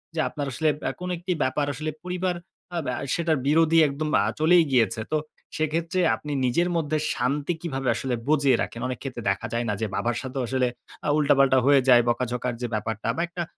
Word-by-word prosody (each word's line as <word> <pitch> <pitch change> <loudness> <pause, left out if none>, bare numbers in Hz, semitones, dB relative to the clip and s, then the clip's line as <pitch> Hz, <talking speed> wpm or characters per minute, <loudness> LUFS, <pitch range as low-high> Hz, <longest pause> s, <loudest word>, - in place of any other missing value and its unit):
যে - - -2
আপনার 145 -2 -4
আসলে 155 +4 +1 0.2
আ - - -1
কোনো 180 - -3
একটি 180 +2 -4
ব্যাপার 130 +3 0
আসলে 155 +3 -4
পরিবার 180 0 -1 0.4
অ্যা 170 - -2
ব্য 125 - -1 0.2
সেটার 165 -3 +1
বিরোধী 165 +2 +4
একদম 150 +2 -3
আ - - 0
চলেই 170 +2 +5
গিয়েছে। 115 -3 +2
তো 155 - +4 0.4
সেক্ষেত্রে 165 +3 -1 0.2
আপনি 150 - -8
নিজের 170 +9 +1
মধ্যে 155 -1 0 0.2
শান্তি 140 +6 0
কিভাবে 135 -6 -3
আসলে 130 -2 -2
বজিয়ে 140 -5 +4
রাখেন? 115 - -7
অনেক 130 -2 -4
ক্ষেত্রে 130 -4 -6
দেখা 105 +4 -3
যায় 120 0 0
না 105 - +1
যে 110 - 0
বাবার 120 0 -1
সাথেও 130 +1 -4
আসলে 130 0 +1 0.4
আ - - +2
উল্টা-পাল্টা 135 -3 +4
হয়ে 140 -1 +6
যায়, 120 -1 +8
বকা-ঝকার 125 0 -1
যে 120 - -1
ব্যাপারটা 110 +1 -3
বা - - 0
একটা 175 0 -4
140 Hz, 200 wpm, -25 LUFS, 125-160 Hz, 0.4 s, যায়